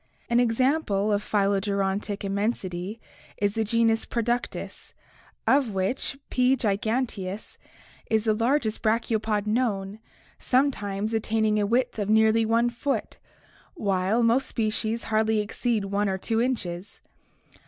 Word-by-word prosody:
An 235 - +4
example 235 -3 +1
of 205 - +1
phylogerontic 200 0 0
immensity 200 -1 -2 0.4
is 200 -1 0
the 225 0 0
genus 225 +1 +2
Productus, 240 +1 -3 0.5
of 260 -7 +2
which 195 +8 -1
P. 255 +1 +3
giganteus 215 -2 -2 0.5
is 220 -1 +2
the 220 -1 +2
largest 230 0 0
brachiopod 220 -2 0
known, 210 -3 -1 0.4
sometimes 220 -6 0
attaining 220 -1 +1
a 205 - +1
width 240 +1 0
of 205 -1 -2
nearly 220 +1 +4
i 230 +1 +4
foot, 260 +4 -3 0.6
while 200 - +1
most'species 230 -2 0
hardly 220 0 +1
exceed 215 0 -1
i 205 +1 +2
or 190 -1 -1
2 225 +4 0
inches. 200 -7 -3
220 Hz, 115 wpm, -26 LUFS, 205-235 Hz, 0.6 s, An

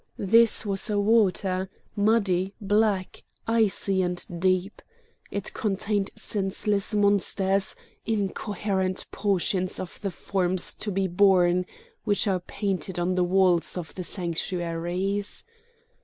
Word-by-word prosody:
This 225 +3 +4
was 200 +2 0
a 205 -1 +1
water, 195 -3 +2 0.3
muddy, 200 -3 +1
black, 205 -2 0 0.2
icy 210 -4 +2
and 180 -1 -1 0.2
deep. 185 +1 0 0.5
It 200 -1 -3
contained 205 -1 -1
senseless 205 0 0
monsters, 200 -1 +2 0.3
incoherent 200 -2 -1
portions 190 -2 0
of 185 - -8
the 200 - -1
forms 185 0 -1
to 210 - -3
be 195 0 0
born, 180 -1 +3 0.4
which 205 -1 +1
are 190 -2 +1
painted 190 -1 -3
on 175 +1 0
the 180 0 +2
walls 180 -1 +3
of 170 -3 -6
the 185 - -5
sanctuaries. 175 +2 -2
195 Hz, 110 wpm, -26 LUFS, 185-205 Hz, 0.5 s, This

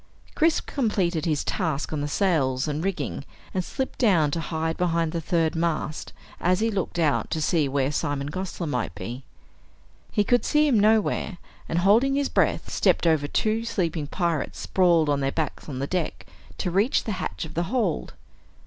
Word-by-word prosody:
Chris 320 0 +3
completed 185 - 0
his 155 -4 0
task 160 -6 -2
on 150 - -1
the 145 - -1
sails 145 -6 +1
and 150 +2 -2
rigging 170 -8 -2 0.3
and 185 - 0
slipped 265 +8 -4
down 175 - +4
to 165 - -1
hide 160 0 -2
behind 170 -2 0
the 170 - -2
third 165 -1 +1
mast 165 -2 -2 0.3
as 180 +2 +2
he 225 +1 +1
looked 190 -3 -2
out 155 -4 +1
to 160 - -1
see 155 -2 +1
where 135 0 +1
Simon 145 -1 -2
Gosler 185 0 -4
might 125 - -2
be. 120 +8 -6 0.9
He 210 - +2
could 245 +4 +2
see 300 0 +3
him 245 -7 +4
nowhere, 215 -2 +2 0.3
and 165 - 0
holding 225 +10 +4
his 280 0 +1
breath, - - +1
stepped - - +2
over 155 -3 +3
two 220 +7 0
sleeping 170 -9 -1
pirates 170 -2 -1
sprawled 175 -4 +3
on 145 -1 +2
their 135 0 0
backs 155 0 -3
on 135 - -5
the 135 - -1
deck 175 +1 -3 0.3
to 180 - -2
reach 200 +9 +2
the 220 - -3
hatch - - -3
of 160 - -9
the 170 +1 -1
hold. 225 -9 -1
170 Hz, 185 wpm, -25 LUFS, 150-200 Hz, 0.9 s, down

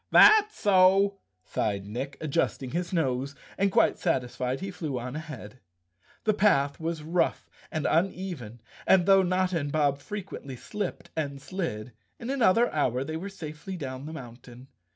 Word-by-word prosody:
"That's 425 0 +7
so," 195 0 +4 0.2
sighed 100 -2 -2
Nick, 135 +7 -5
adjusting 135 -3 -1
his 175 +1 -2
nose, 140 -5 0 0.2
and 195 0 +1
quite - - +3
satisfied 130 -4 -1
he 195 +1 -5
flew 155 -7 -4
on 125 +2 -5
ahead. 130 -8 -8 0.6
The 215 - +3
path 145 -9 +3
was 165 -1 -3
rough 170 +3 0 0.2
and 155 - -2
uneven 165 - -1 0.3
and, 185 -2 +5
though 195 0 +6
Notta 185 -1 +1
and 145 -1 -3
Bob 145 -2 +2
frequently 195 -8 -7
slipped 205 - -5
and 140 -3 -3
slid, 135 - -4 0.3
in 235 +3 -4
another 240 -3 +3
hour 130 -4 +1
they 155 +3 -5
were 185 +5 -4
safely 175 +1 -7
down 135 -2 -6
the 160 - -7
mountain. 125 -1 -11
155 Hz, 150 wpm, -28 LUFS, 130-190 Hz, 0.6 s, That's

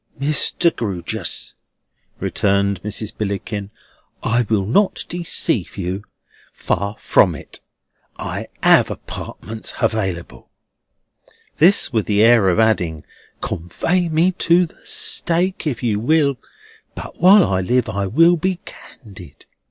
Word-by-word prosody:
"Mr. 155 +3 +1
Grewgious," 95 -7 -4 0.7
returned 100 0 0
Mrs. 105 0 -4
Billickin, 100 0 -4 0.5
"I 120 +2 +2
will 105 -3 +1
not 195 - +1
deceive 165 - -1
you; 95 +2 -4 0.5
far 100 +1 -2
from - - +3
it. - - -11 0.6
I - - -5 0.2
have - - +5
apartments 110 0 -7
available." 100 -7 -2 1.1
This 170 -4 +4
with 110 -3 0
the 105 0 +3
air 115 -4 +5
of 90 - +1
adding: 90 -9 +1 0.4
"Convey 170 - -1
me 165 +4 +2
to 175 +2 +4
the 160 - -18
stake, 175 +1 +1
if 125 -6 -3
you 110 -4 0
will; 140 +1 +2 0.6
but - - -9
while 190 +2 +7
I 95 -1 0
live, 125 +6 +1
I 100 0 -2
will 165 - +4
be 185 +3 -1
candid." 90 - -13
110 Hz, 120 wpm, -19 LUFS, 100-160 Hz, 1.1 s, while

